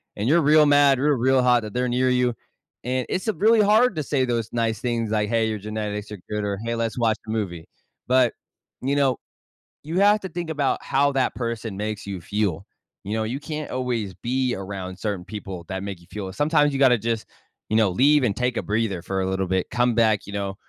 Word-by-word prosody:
and 105 Hz, -, -2 dB
you're 165 Hz, +5 st, +4 dB
real 150 Hz, 0 st, +5 dB
mad, 145 Hz, -1 st, +5 dB
you're 145 Hz, +1 st, +2 dB
real 130 Hz, +2 st, +3 dB
hot 125 Hz, -1 st, +4 dB
that 105 Hz, -1 st, -7 dB
they're 125 Hz, 0 st, 0 dB
near 130 Hz, +1 st, +2 dB
you 125 Hz, -1 st, +2 dB, 0.5 s
and 130 Hz, 0 st, -1 dB
it's 185 Hz, -, -2 dB
a -, -, +1 dB
really 220 Hz, +2 st, +4 dB
hard 215 Hz, +1 st, +4 dB
to 155 Hz, -, -2 dB
say 135 Hz, -2 st, 0 dB
those 115 Hz, -3 st, -2 dB
nice 115 Hz, -2 st, 0 dB
things 115 Hz, -2 st, -1 dB
like, 105 Hz, -1 st, 0 dB
"Hey, 115 Hz, -1 st, +2 dB
your 110 Hz, -, -2 dB
genetics 105 Hz, 0 st, -4 dB
are 105 Hz, -, -7 dB
good," 105 Hz, 0 st, -2 dB
or, 100 Hz, -1 st, -2 dB
"Hey, 115 Hz, -, -1 dB
let's 115 Hz, 0 st, -2 dB
watch 115 Hz, -2 st, +2 dB
a -, -, -8 dB
movie." 90 Hz, -7 st, -3 dB, 0.4 s
But, 125 Hz, -2 st, +4 dB, 0.5 s
you 135 Hz, +2 st, 0 dB
know, 135 Hz, -2 st, +3 dB, 0.7 s
you 165 Hz, +5 st, -2 dB
have 205 Hz, +1 st, +5 dB
to 190 Hz, -, -4 dB
think 175 Hz, -2 st, -5 dB
about 145 Hz, -3 st, 0 dB
how 140 Hz, +1 st, +2 dB
that 135 Hz, -1 st, +1 dB
person 115 Hz, -4 st, -4 dB
makes 105 Hz, 0 st, -4 dB
you 100 Hz, -2 st, -4 dB
feel, 100 Hz, -2 st, -2 dB, 0.4 s
you 100 Hz, -, -3 dB
know, 110 Hz, 0 st, 0 dB
you 120 Hz, +5 st, -3 dB
can't 155 Hz, 0 st, -6 dB
always 120 Hz, -6 st, -2 dB
be 125 Hz, +4 st, -1 dB
around 95 Hz, -1 st, -6 dB
certain 100 Hz, -3 st, -3 dB
people 95 Hz, -4 st, -7 dB
that 95 Hz, 0 st, -4 dB
make 100 Hz, -3 st, -6 dB
you 85 Hz, -, -20 dB
feel 95 Hz, -3 st, -5 dB
Sometimes 145 Hz, -, +2 dB
you 135 Hz, -, -2 dB
gotta 130 Hz, -3 st, +5 dB
just, 115 Hz, 0 st, -3 dB, 0.4 s
you 110 Hz, -, +2 dB
know, 110 Hz, -3 st, +4 dB
leave 140 Hz, +8 st, +4 dB
and 105 Hz, -5 st, +1 dB
take 125 Hz, -1 st, -1 dB
a -, -, -1 dB
breather 105 Hz, -4 st, -1 dB
for 95 Hz, +2 st, -2 dB
a 95 Hz, -, -1 dB
little 95 Hz, 0 st, -1 dB
bit, 95 Hz, 0 st, -1 dB
come 120 Hz, -2 st, +2 dB
back, 110 Hz, -3 st, +3 dB
you 100 Hz, -, -8 dB
know, 100 Hz, -1 st, -3 dB
115 Hz, 230 wpm, -23 LUFS, 105-135 Hz, 0.7 s, real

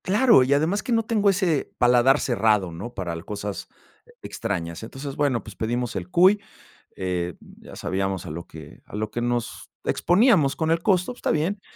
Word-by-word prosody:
Claro, 210 Hz, -, +5 dB
y 130 Hz, -, -1 dB
además 160 Hz, +8 st, +1 dB
que -, -, -5 dB
no 225 Hz, -1 st, +2 dB
tengo 210 Hz, -3 st, +2 dB
ese 180 Hz, -6 st, 0 dB
paladar 125 Hz, +3 st, +4 dB
cerrado, 105 Hz, -6 st, +1 dB
¿no? 95 Hz, +9 st, -7 dB
Para 90 Hz, -5 st, -4 dB
l 85 Hz, 0 st, -7 dB
cosas 105 Hz, -1 st, -5 dB, 0.6 s
extrañas. 85 Hz, -7 st, -4 dB
Entonces, 135 Hz, +5 st, -7 dB
bueno, 140 Hz, -6 st, 0 dB
pues 105 Hz, -, -11 dB
pedimos 120 Hz, +1 st, -2 dB
el 90 Hz, -2 st, -5 dB
cuy, 190 Hz, -, +5 dB, 0.5 s
eh, 90 Hz, -2 st, -3 dB
ya -, -, -14 dB
sabíamos 95 Hz, 0 st, -2 dB
a 85 Hz, -, -6 dB
lo 85 Hz, +2 st, -7 dB
que 80 Hz, -2 st, -12 dB
a -, -, -11 dB
lo 110 Hz, +1 st, -3 dB
que 120 Hz, -, -3 dB
nos 120 Hz, 0 st, -3 dB
exponíamos 180 Hz, -, +3 dB
con 160 Hz, 0 st, 0 dB
el 165 Hz, 0 st, +1 dB
costo, 185 Hz, +3 st, +1 dB
pues -, -, -18 dB
está -, -, -2 dB
bien. 175 Hz, +7 st, -1 dB
120 Hz, 190 wpm, -24 LUFS, -, 0.6 s, Claro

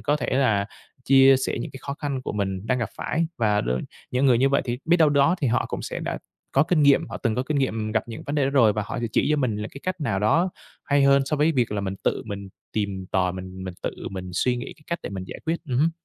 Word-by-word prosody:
có 145 Hz, +1 st, +1 dB
thể -, -, -3 dB
là 115 Hz, -7 st, +2 dB, 0.4 s
chia 135 Hz, 0 st, +7 dB
sẻ 130 Hz, -, -2 dB
những -, -, -5 dB
cái 135 Hz, -, -9 dB
khó 140 Hz, -, -4 dB
khăn 140 Hz, -3 st, -3 dB
của -, -, -4 dB
mình 95 Hz, -1 st, -2 dB
đang 125 Hz, +2 st, +1 dB
gặp 115 Hz, -4 st, -2 dB
phải 165 Hz, +2 st, -1 dB
và 105 Hz, -3 st, +2 dB
đôi 65 Hz, +1 st, -1 dB, 0.3 s
những 130 Hz, +2 st, +2 dB
người 125 Hz, -3 st, +5 dB
như 135 Hz, +2 st, +4 dB
vậy 140 Hz, -, +2 dB
thì 120 Hz, -1 st, -2 dB
biết 170 Hz, +2 st, +4 dB
đâu 160 Hz, -3 st, +5 dB
đó 140 Hz, +4 st, +4 dB
thì 135 Hz, -, +2 dB
họ 120 Hz, -, +1 dB
cũng -, -, -4 dB
sẽ -, -, -4 dB
đã -, -, -3 dB, 0.3 s
có 135 Hz, -, +5 dB
kinh 160 Hz, -2 st, +2 dB
nghiệm, 140 Hz, -1 st, +4 dB
họ -, -, -5 dB
từng 115 Hz, -4 st, 0 dB
có 125 Hz, -, 0 dB
kinh 145 Hz, +1 st, -1 dB
nghiệm 110 Hz, -5 st, -1 dB
gặp 110 Hz, -, +1 dB
những 115 Hz, -, -7 dB
vấn 145 Hz, -, -2 dB
đề 145 Hz, -2 st, +2 dB
đó 135 Hz, -, +1 dB
rồi, 120 Hz, -7 st, +5 dB
và 105 Hz, -, -2 dB
họ -, -, -4 dB
sẽ 120 Hz, -, -1 dB
chỉ -, -, +2 dB
cho 150 Hz, -, +3 dB
mình 125 Hz, -7 st, 0 dB
là 105 Hz, +1 st, -4 dB
cái 140 Hz, -, -10 dB
cách 185 Hz, -2 st, -3 dB
nào 95 Hz, -10 st, 0 dB
đó 165 Hz, -, +2 dB, 0.3 s
hay 145 Hz, 0 st, +3 dB
hơn 140 Hz, 0 st, +5 dB
so 150 Hz, +2 st, -1 dB
với 155 Hz, +3 st, +3 dB
việc 125 Hz, -7 st, +1 dB
là 100 Hz, -, -1 dB
mình 95 Hz, -1 st, -3 dB
tự -, -, +1 dB
mình 100 Hz, -2 st, -6 dB, 0.2 s
tìm 100 Hz, -3 st, -2 dB
tòi, 90 Hz, -1 st, +2 dB
mình 95 Hz, 0 st, -7 dB
mình 95 Hz, -1 st, -6 dB
tự -, -, -1 dB, 0.2 s
mình 95 Hz, -1 st, -6 dB
suy 125 Hz, +7 st, +1 dB
nghĩ 120 Hz, -, -6 dB
cái 150 Hz, -, -22 dB
cách 170 Hz, -, -2 dB
để -, -, -5 dB
mình 95 Hz, -1 st, -5 dB
giải -, -, -8 dB
quyết. 165 Hz, +1 st, 0 dB
Ừm 125 Hz, -, 0 dB
hứm. 160 Hz, +4 st, +4 dB
125 Hz, 295 wpm, -24 LUFS, 105-140 Hz, 0.4 s, chia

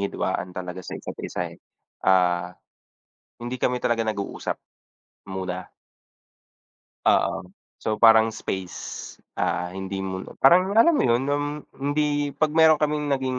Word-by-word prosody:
hidwaan 95 Hz, -2 st, -2 dB
talaga 90 Hz, 0 st, -5 dB
sa -, -, -7 dB
isa't-isa, -, -, -5 dB
eh, -, -, -17 dB, 0.4 s
ah, 90 Hz, -2 st, +3 dB, 0.9 s
hindi 125 Hz, +1 st, -4 dB
kami 125 Hz, 0 st, 0 dB
talaga 115 Hz, -1 st, +1 dB
nag-uusap, 100 Hz, -2 st, -3 dB, 0.8 s
muna. 95 Hz, -1 st, -4 dB, 1.4 s
Oo, -, -, +2 dB, 0.3 s
so 110 Hz, -, -1 dB
parang 110 Hz, -1 st, +7 dB
space, 95 Hz, -4 st, -6 dB, 0.2 s
ah, 90 Hz, 0 st, 0 dB
hindi 95 Hz, +1 st, -5 dB
mun 95 Hz, 0 st, -4 dB, 0.2 s
parang 185 Hz, +3 st, +6 dB
alam 300 Hz, +9 st, +6 dB
mo -, -, +3 dB
'yon, 120 Hz, +2 st, +3 dB
um, 145 Hz, 0 st, 0 dB, 0.3 s
hindi 145 Hz, 0 st, 0 dB
'pag 155 Hz, -1 st, +1 dB
meron 160 Hz, 0 st, +6 dB
kaming 150 Hz, 0 st, 0 dB
naging 130 Hz, -1 st, -2 dB
115 Hz, 125 wpm, -24 LUFS, 95-145 Hz, 1.4 s, parang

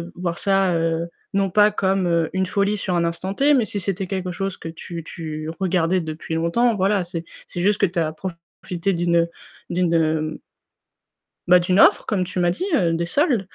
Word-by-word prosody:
voir 175 Hz, -1 st, -3 dB
ça, 195 Hz, -2 st, +2 dB
heu, 165 Hz, 0 st, 0 dB, 0.3 s
non 195 Hz, -1 st, +1 dB
pas 210 Hz, +3 st, +5 dB
comme 185 Hz, -5 st, +1 dB
une 190 Hz, 0 st, +1 dB
folie 200 Hz, +2 st, 0 dB
sur 185 Hz, -2 st, -2 dB
un 170 Hz, -, +2 dB
instant 170 Hz, +3 st, -3 dB
T, 285 Hz, +6 st, +3 dB
mais 245 Hz, -5 st, +3 dB
si 205 Hz, -, -4 dB
c'était 195 Hz, 0 st, -2 dB
quelque 185 Hz, -2 st, -3 dB
chose 195 Hz, +1 st, -3 dB
que 165 Hz, -, -7 dB
tu 165 Hz, 0 st, -7 dB
tu 155 Hz, -2 st, -6 dB
regardais 180 Hz, -1 st, +1 dB
depuis 160 Hz, +1 st, -5 dB
longtemps, 220 Hz, +8 st, +2 dB
voilà, 195 Hz, 0 st, +1 dB
c'est 170 Hz, -1 st, -5 dB, 0.2 s
c'est 175 Hz, -, -5 dB
juste 205 Hz, +2 st, +2 dB
que -, -, +6 dB
tu 175 Hz, -1 st, -2 dB
as 155 Hz, -1 st, 0 dB
profité 175 Hz, +2 st, -4 dB
d'une 170 Hz, -1 st, +2 dB, 0.4 s
d'une 160 Hz, -3 st, +1 dB, 1.1 s
bah, 180 Hz, 0 st, +7 dB
«d'une 180 Hz, +3 st, +1 dB
offre», -, -, +6 dB
comme 195 Hz, -4 st, 0 dB
tu 180 Hz, 0 st, -4 dB
m'as 175 Hz, 0 st, +3 dB
dit, 200 Hz, -, -3 dB
heu, 170 Hz, -3 st, +2 dB
des 170 Hz, +1 st, -1 dB
soldes. 260 Hz, -, +2 dB
180 Hz, 190 wpm, -22 LUFS, 170-195 Hz, 1.1 s, bah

